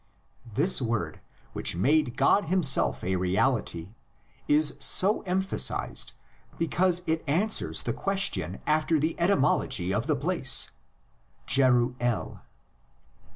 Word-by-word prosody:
This 185 - +3
word, 115 -3 -3 0.3
which - - 0
made 135 - 0
God 205 - +2
himself 140 - +2
a 95 +1 -1
reality, 95 -1 -2 0.5
is 150 -1 +2
so 190 +9 +4
emphasised 190 +1 0 0.4
because 180 +2 0
it 160 -1 -2
answers 195 +10 0
the - - -3
question 100 - -2
after 155 +1 0
the 160 +3 -2
etymology 145 - 0
of 115 +4 -2
the - - +1
place 150 -1 +1 0.7
(Jeruel). 125 -2 0
145 Hz, 105 wpm, -26 LUFS, 115-175 Hz, 0.7 s, so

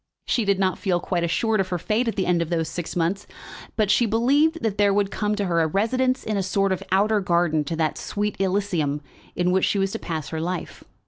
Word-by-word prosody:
She 235 - 0
did 200 -1 +2
not 190 -1 0
feel 180 -3 +1
quite 175 0 -2
assured 215 +5 +1
of 190 - +1
her 180 - -2
fate 215 +7 0
at 225 - -1
the 190 - 0
end 175 -1 +2
of 165 - -2
those 165 -2 0
six 165 +1 -5
months, 180 +4 -1 0.5
but 210 -2 +2
she 235 +2 +3
believed 280 +8 +2
that 210 -3 -1
there 205 -1 +4
would 200 0 +1
come 210 0 -1
to 205 -1 -1
her 170 -2 +1
a 160 - +2
residence 255 - 0
in 215 -2 -2
a - - +1
sort 195 +1 0
of 190 0 -1
outer 205 +3 +3
garden 170 -4 +1
to 165 - -3
that 160 -1 -1
sweet 210 0 -2
Elysium 185 -7 0 0.3
in 180 0 +1
which 190 0 +3
she - - 0
was 195 0 0
to - - -4
pass 160 -5 -4
her 160 -1 -3
life. 180 +1 -4
195 Hz, 245 wpm, -24 LUFS, 175-210 Hz, 0.5 s, there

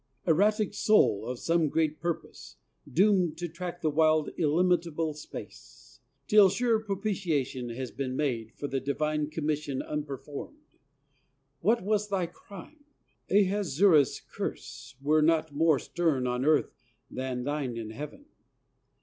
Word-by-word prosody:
Erratic 205 +5 +2
Soul 160 - +3
of 125 0 -3
some 165 +2 +1
great 155 0 0
Purpose, 170 0 -5 0.4
doomed 180 -1 +3
To 175 +1 -3
track 175 +1 -7
the 155 - +1
wild 155 0 +3
illimitable 165 -1 +1
space, 150 - -11 0.3
Till 205 +3 +6
sure 225 +3 +1
propitiation 185 - -2
has 125 +2 -5
been 130 -1 -4
made 120 -6 -2
For 145 - -4
the 135 -1 -1
divine 150 +2 -1
commission 150 -3 -2
unperformed! 145 - -6 1.0
What 220 +7 +2
was 210 +1 0
thy 190 -3 0
crime? 200 - -13 0.5
Ahasuerus' 190 -6 +3
curse 125 +1 -7
Were 155 +2 +3
not 160 -1 +2
more 155 0 +3
stern 150 -4 0
on 125 +1 -1
earth 155 0 +3 0.4
than 130 -1 -3
thine 140 -4 -2
in 110 -1 -5
Heaven! 150 - -8
155 Hz, 125 wpm, -29 LUFS, 140-185 Hz, 1.0 s, Till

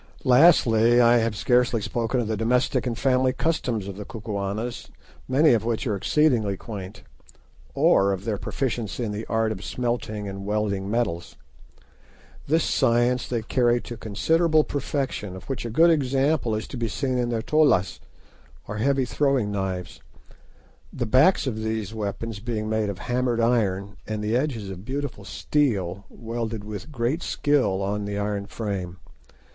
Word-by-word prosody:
Lastly, 125 -5 +5
I 120 0 +6
have 115 -2 0
scarcely 125 +1 +2
spoken 115 +4 -1
of 120 - -1
the 110 - -1
domestic 125 +4 +1
and 115 -2 -2
family 130 0 +2
customs 125 -10 -1
of 100 -1 -7
the 105 - -5
Kukuanas, 105 +2 -4 0.4
many 140 +2 +4
of 115 - +1
which 115 +2 -1
are 110 -5 0
exceedingly 110 -2 +2
quaint, 100 -4 -8 0.7
or 100 0 +4
of 95 +1 -4
their 105 -3 -2
proficiency 120 -3 -3
in 110 - -2
the 105 +2 -5
art 110 -1 +1
of 100 -2 -6
smelting 120 -4 -3
and 100 0 -6
welding 100 -1 -1
metals. 105 -7 -2 1.1
This 160 +3 +2
science 120 -1 +2
they 120 -3 -2
carry 120 +1 +2
to 120 - -7
considerable 155 +10 +2
perfection, 135 -9 -3
of 95 - -9
which 135 -3 -4
a - - -5
good 165 +9 +5
example 135 -4 +1
is 110 - -4
to 135 - -6
be 120 -1 -1
seen 130 +3 -1
in 120 -1 0
their 115 -2 -2
"tollas," 150 - +2 0.7
or 105 - -5
heavy 135 +3 +1
throwing 135 -5 +1
knives, 95 -4 -4 0.9
the 120 - -3
backs 135 - +4
of 125 -5 -2
these 110 -1 -3
weapons 110 0 -4
being 110 -1 -3
made 110 -1 0
of 100 - -4
hammered 125 +1 -1
iron, 105 -4 0
and 110 -1 -3
the 110 +2 0
edges 125 -6 -1
of 95 0 -8
beautiful 140 +5 -4
steel 100 -10 -1
welded 115 -2 -5
with 105 +8 -7
great 130 +5 -1
skill 135 - +1
on 100 +2 -1
to 105 - -4
the 100 0 -3
iron 100 -1 -2
frames. 100 -6 -4
115 Hz, 160 wpm, -25 LUFS, 105-130 Hz, 1.1 s, I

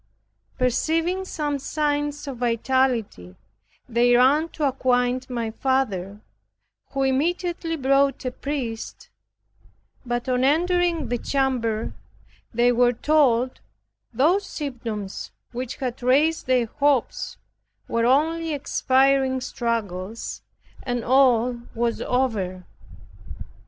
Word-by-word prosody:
Perceiving 325 +9 0
some 295 -5 -2
signs 290 0 -2
of 270 -3 -5
vitality, 235 - 0 0.5
they 240 0 +3
ran 285 +6 +4
to 300 -3 -1
acquaint 255 -1 0
my 235 -3 -2
father, 210 -7 -1 0.7
who 275 0 0
immediately 330 +5 0
brought 275 -1 +2
a 255 - -1
priest; 250 -4 -5 0.9
but 240 +1 -3
on 255 0 +1
entering 335 0 +2
the 245 0 -1
chamber 245 -6 -1 0.6
they 240 +1 +3
were 245 0 +3
told 255 -3 +2 0.5
those 320 - +3
symptoms 230 - -5 0.2
which 250 0 -5
had 255 -3 -4
raised 285 +6 +2
their 255 -2 +3
hopes 280 +1 0 0.5
were 230 0 +1
only 320 +4 +2
expiring 265 -1 +2
struggles, 225 -5 -3 0.4
and 245 -2 -2
all 250 -2 +3 0.2
was 235 0 -1
over. 200 -8 -1
255 Hz, 100 wpm, -24 LUFS, 235-290 Hz, 0.9 s, ran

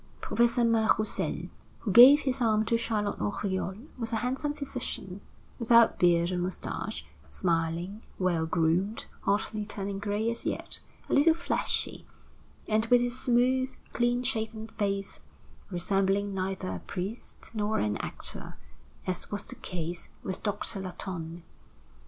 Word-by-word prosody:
Professor 235 0 +2
Mas 225 -1 +3
Roussel, 215 -1 -2 0.3
who 210 - -1
gave 255 +7 +10
his 265 -1 -1
arm 220 -2 +3
to 230 - +2
Charlotte 215 -3 -1
Oriol, 190 -2 -1 0.2
was 230 -1 -2
a - - 0
handsome 260 +6 -1
physician, 250 -9 -5 0.4
without 235 -1 +5
beard 170 0 +4
or 180 - -1
mustache, 175 - -4 0.2
smiling, 170 - -1 0.2
well 175 -3 +1
groomed, 175 +6 +1 0.2
hardly 210 +1 0
turning 200 -2 -4
gray 210 +3 0
as 230 - -5
yet, - - -3 0.3
a - - -2
little 320 +3 +6
fleshy, 335 - -1 0.6
and, 220 +1 +2
with 245 +1 +6
his 245 0 0
smooth, 255 +2 +2 0.2
clean 240 +1 +1
shaven 220 -3 -1
face, 200 -1 -2 0.5
resembling 195 +2 +1
neither 190 - -2
a 90 - -4
priest 195 - -6
nor 215 0 0
an 105 0 +1
actor, - - -4 0.5
as 185 -1 -2
was 205 0 -4
the - - -8
case 170 -1 -4
with 185 - -4
Doctor 205 0 -1
Latonne. 175 -2 -6
205 Hz, 135 wpm, -29 LUFS, 185-235 Hz, 0.6 s, gave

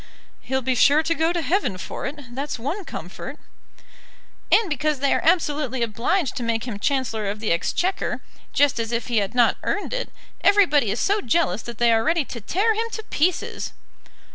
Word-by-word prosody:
"He'll 265 0 -2
be 260 +1 +1
sure 290 +5 +5
to 330 - +1
go 325 +1 +1
to 345 -2 -1
Heaven 315 - 0
for 180 - -5
it, 275 -4 -9
that's 280 +2 -3
one 310 - -4
comfort." - - -7 1.1
"And 450 - +5
because 300 -2 0
they 280 0 +2
are - - +1
absolutely 295 -6 +1
obliged 245 - 0
to - - -2
make 230 -1 0
him 230 -5 -5
Chancellor 225 -4 0
of 205 +1 -4
the 215 - -1
Exchequer, 350 - 0 0.3
just 285 -4 +3
as 230 0 -2
if 235 +1 -2
he 235 - +1
had 200 +2 0
not 240 -2 +4
earned 410 - -2
it, - - -2 0.3
everybody 340 - +4
is 210 - -1
so 405 +1 +2
jealous 270 -3 +1
that 235 -2 -8
they 235 -1 +4
are 225 0 +3
ready 325 0 +2
to 235 - -7
tear 400 - +1
him 450 +2 -2
to 440 - -4
pieces!" 340 +4 0
275 Hz, 190 wpm, -23 LUFS, 235-335 Hz, 1.1 s, sure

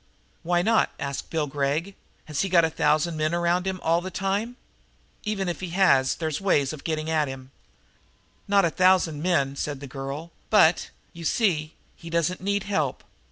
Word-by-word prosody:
"Why 175 +1 +1
not?" 225 +2 +3
asked 140 0 -4
Bill 160 -2 0
Gregg. 145 +6 -1 0.3
"Has 150 -2 -2
he 195 - -1
got 170 -2 +5
a 160 - -2
thousand 155 +2 +1
men 155 +2 0
around 175 +2 +1
him 190 -1 -2
all 165 +1 +2
the 185 - -5
time? 195 +6 -2 0.7
Even 205 -3 -1
if 175 -3 -3
he 185 - -5
has 135 -9 +4
they's 160 -1 -3
ways 145 -8 +2
of 150 - -9
getting 155 -1 -2
at 155 -2 +1
him." 135 0 -8 1.0
"Not 200 -2 +4
a 165 - +1
thousand 185 -5 +3
men," 140 -6 +1
said 145 0 -3
the 140 - -8
girl, 140 +5 -6 0.2
"but, 175 -6 +4 0.2
you 170 - -9
see, 160 -4 0 0.2
he 165 - -11
doesn't 170 +2 0
need 200 +1 0
help. 200 0 -1
165 Hz, 180 wpm, -25 LUFS, 150-185 Hz, 1.0 s, got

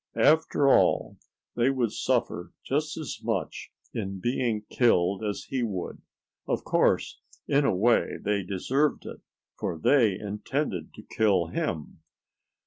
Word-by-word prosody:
After 155 -2 +4
all - - +3 0.4
they 120 +2 +3
would 125 -5 0
suffer 115 -10 -1
just 150 +3 -1
as 155 -3 -5
much - - -3 0.2
in 95 -3 -4
being 115 0 -1
killed 100 -4 +2
as 105 -1 -3
he 130 - -3
would. 100 -6 -4 0.5
Of - - -1
course, - - +1 0.3
in 140 0 +3
a 95 - +2
way 115 +6 +2
they 105 -1 0
deserved 130 +11 0
it, - - -9 0.4
for 80 - -2
they 110 - +3
intended 105 - -3
to - - -11
kill 100 -6 +1
him. 90 - -4
115 Hz, 135 wpm, -27 LUFS, 95-135 Hz, 0.5 s, After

